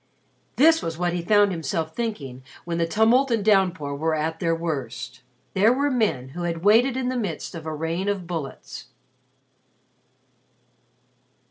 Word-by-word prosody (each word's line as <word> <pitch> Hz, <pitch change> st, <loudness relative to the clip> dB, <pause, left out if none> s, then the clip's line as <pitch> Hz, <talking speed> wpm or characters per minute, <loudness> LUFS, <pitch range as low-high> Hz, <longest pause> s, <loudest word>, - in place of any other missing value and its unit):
This 325 Hz, +4 st, +5 dB
was 165 Hz, -1 st, -4 dB
what 175 Hz, 0 st, 0 dB
he 175 Hz, -, -1 dB
found 205 Hz, +2 st, +4 dB
himself 160 Hz, -1 st, -3 dB
thinking 145 Hz, -, -4 dB, 0.2 s
when 170 Hz, -1 st, -2 dB
the 165 Hz, -, +1 dB
tumult 230 Hz, +8 st, +3 dB
and 225 Hz, -4 st, 0 dB
downpour 185 Hz, -8 st, +2 dB
were 160 Hz, +2 st, 0 dB
at 160 Hz, +1 st, -2 dB
their 165 Hz, -2 st, +1 dB
worst. 145 Hz, -9 st, -5 dB, 0.3 s
There 205 Hz, +4 st, +4 dB
were 280 Hz, +3 st, +1 dB
men 210 Hz, -, 0 dB
who 175 Hz, +6 st, -7 dB
had 170 Hz, -1 st, -3 dB
waited 240 Hz, +5 st, +4 dB
in 255 Hz, -1 st, -1 dB
the 255 Hz, -, -2 dB
midst 200 Hz, -10 st, -4 dB
of 160 Hz, -2 st, -8 dB
a 155 Hz, -, -3 dB
rain 165 Hz, +5 st, -2 dB
of 195 Hz, -3 st, -2 dB
bullets. 165 Hz, -6 st, -6 dB
175 Hz, 155 wpm, -24 LUFS, 160-220 Hz, 0.3 s, This